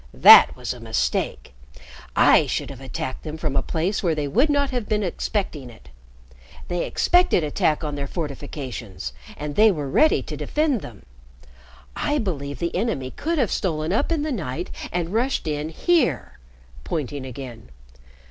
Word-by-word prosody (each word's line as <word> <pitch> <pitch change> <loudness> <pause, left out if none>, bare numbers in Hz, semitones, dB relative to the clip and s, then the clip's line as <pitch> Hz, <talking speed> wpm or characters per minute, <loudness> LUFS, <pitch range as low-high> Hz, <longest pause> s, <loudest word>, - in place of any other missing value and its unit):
"That - - +9
was - - -4
a - - -11
mistake. 65 0 -2 0.6
I - - +5
should - - -2
have 135 -1 -10
attacked 130 0 -5
them 155 0 -6
from 155 -3 -2
a 135 - +3
place 170 +8 -1
where 165 -3 +1
they 150 -1 -2
would 250 - +2
not 285 -1 +1
have 245 -5 -3
been 210 -1 +1
expecting 175 - -3
it. 65 - -16 0.8
They 175 -1 -1
expected 355 - +3
attack 150 +1 0
on 150 -1 -3
their 140 -1 -3
fortifications, 130 - -6 0.2
and 150 -1 -5
they 220 0 +6
were 150 -6 -3
ready 310 - +3
to - - -6
defend 300 -7 0
them. 110 -5 -11 0.9
I 295 0 0
believe 145 - -3
the 170 +4 -3
enemy 180 - -1
could 330 +2 -2
have 250 -8 +1
stolen 160 -2 -1
up 275 +10 0
in 315 -3 0
the 310 - -2
night 165 - -4 0.2
and 175 +1 -2
rushed 245 -3 0
in 150 0 -2
here," 245 - 0 0.4
pointing 145 - -3
again. 125 - -9
160 Hz, 165 wpm, -23 LUFS, 140-220 Hz, 0.9 s, That